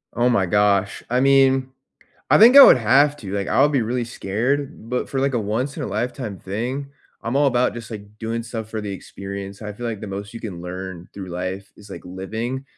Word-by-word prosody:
Oh 120 Hz, +1 st, +2 dB
my 100 Hz, -6 st, +2 dB
gosh, 100 Hz, +1 st, +1 dB
I 125 Hz, +1 st, +1 dB
mean, 135 Hz, -1 st, +3 dB, 0.6 s
I -, -, +6 dB
think 240 Hz, +5 st, +8 dB
I 280 Hz, -, +13 dB
would 130 Hz, -, +8 dB
have 140 Hz, +6 st, +4 dB
to, 100 Hz, -6 st, -8 dB
like, 100 Hz, -1 st, -2 dB
I'll 140 Hz, +2 st, +4 dB
be 140 Hz, -4 st, +1 dB
really 120 Hz, +2 st, -2 dB
scared, 120 Hz, +4 st, -3 dB
but 125 Hz, -, -2 dB
for, 135 Hz, -, -2 dB
like, 135 Hz, -1 st, 0 dB
a 120 Hz, -, +2 dB
once 115 Hz, +7 st, -2 dB
in -, -, -4 dB
a -, -, -3 dB
lifetime 110 Hz, -1 st, -4 dB
thing, 125 Hz, +8 st, -4 dB, 0.3 s
I'm 115 Hz, +4 st, -2 dB
all 145 Hz, -, +4 dB
about 125 Hz, -2 st, +1 dB
just, 115 Hz, -1 st, -8 dB
like, 105 Hz, -1 st, -10 dB
doing 115 Hz, +1 st, -3 dB
stuff 115 Hz, -2 st, -6 dB
for 110 Hz, -, -3 dB
the 105 Hz, -1 st, -5 dB
experience. 100 Hz, +1 st, -8 dB
I 105 Hz, 0 st, -5 dB
feel 120 Hz, +4 st, -6 dB
like 110 Hz, -3 st, -4 dB
the 105 Hz, -, -6 dB
most 100 Hz, +1 st, -6 dB
you 115 Hz, -, -8 dB
can 95 Hz, -6 st, -7 dB
learn 90 Hz, -1 st, -7 dB
through 95 Hz, -2 st, -8 dB
life 90 Hz, +2 st, -5 dB
is, 105 Hz, -1 st, -15 dB
like, -, -, -8 dB
living, 110 Hz, +8 st, -5 dB
110 Hz, 225 wpm, -22 LUFS, 100-130 Hz, 0.6 s, I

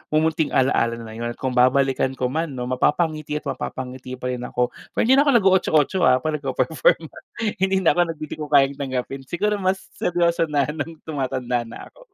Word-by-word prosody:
mumunting 160 Hz, 0 st, +1 dB
alala 115 Hz, -3 st, +2 dB
na 115 Hz, -1 st, -9 dB
'yon. 120 Hz, +1 st, -5 dB
Kung 130 Hz, -, -3 dB
babalikan 130 Hz, +1 st, +2 dB
ko 125 Hz, -1 st, -2 dB
'man, 160 Hz, -2 st, -2 dB
'no, 125 Hz, 0 st, -4 dB
mapapangiti 155 Hz, +3 st, 0 dB
at 150 Hz, -, -3 dB
mapapangiti 130 Hz, -2 st, -5 dB
pa 125 Hz, 0 st, -4 dB
rin 125 Hz, 0 st, -4 dB
ako. 125 Hz, 0 st, -1 dB, 0.2 s
Pero -, -, +2 dB
hindi 265 Hz, +4 st, +5 dB
na 290 Hz, -, +3 dB
ako 280 Hz, -, +6 dB
nago-Otso-otso 185 Hz, -, +3 dB
ah, 130 Hz, 0 st, +3 dB
'pag 155 Hz, -1 st, -1 dB
nagpe-perform. 140 Hz, +3 st, +1 dB, 0.6 s
Hindi 190 Hz, 0 st, +1 dB
na 165 Hz, -, +5 dB
ako 165 Hz, +1 st, +1 dB
nag, -, -, -25 dB
Hindi 155 Hz, -, -6 dB
Ko 150 Hz, -, -4 dB
Kayang 140 Hz, -1 st, +3 dB
Tanggapin, 135 Hz, 0 st, -4 dB
siguro 205 Hz, +6 st, -1 dB
mas 190 Hz, 0 st, 0 dB, 0.2 s
seryoso 170 Hz, -1 st, +1 dB
na, 145 Hz, -2 st, +1 dB
nung 160 Hz, +2 st, -5 dB
tumatanda 130 Hz, -5 st, -2 dB
na -, -, -9 dB
ako. -, -, -23 dB
145 Hz, 195 wpm, -22 LUFS, 130-165 Hz, 0.6 s, ako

